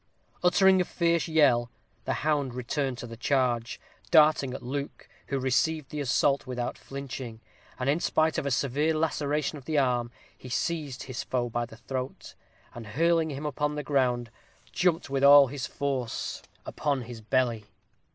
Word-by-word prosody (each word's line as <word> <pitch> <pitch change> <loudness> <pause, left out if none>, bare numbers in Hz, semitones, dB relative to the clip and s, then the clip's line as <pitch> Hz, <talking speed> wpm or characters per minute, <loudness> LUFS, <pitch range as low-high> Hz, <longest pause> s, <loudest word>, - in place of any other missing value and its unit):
Uttering 190 +1 +5
a - - +3
fierce 170 -2 0
yell, 135 -7 +3 0.4
the - - 0
hound 145 -5 +1
returned 125 +1 -2
to 120 - -6
the 115 -1 -8
charge, 120 -1 0 0.3
darting 150 -4 +5
at - - -8
Luke, 140 +3 -5 0.2
who 140 - -1
received 135 +3 0
the 150 - -4
assault 140 +1 +1
without 125 -1 -3
flinching; 130 -4 -7 0.4
and 130 - -3
in 145 +4 +2
spite 160 -2 +1
of - - -3
a - - +1
severe 140 +4 +1
laceration 150 -1 -1
of 130 - -18
the 155 0 -1
arm, 125 -3 +1 0.3
he 130 - -11
seized 145 -1 -2
his 130 -2 -5
foe 120 -1 -1
by 120 0 -2
the 110 - -13
throat, 130 +2 -6 0.4
and 115 -2 -9
hurling 165 -1 +3
him 145 +1 -5
upon 150 +1 -1
the 150 - -3
ground, 125 -4 0 0.4
jumped 175 -5 +1
with 135 0 0
all 140 0 +9
his 135 -1 -4
force 135 -5 -3 0.2
upon 140 -4 -1
his 115 -1 -9
belly. 115 -1 0
140 Hz, 165 wpm, -28 LUFS, 125-150 Hz, 0.4 s, all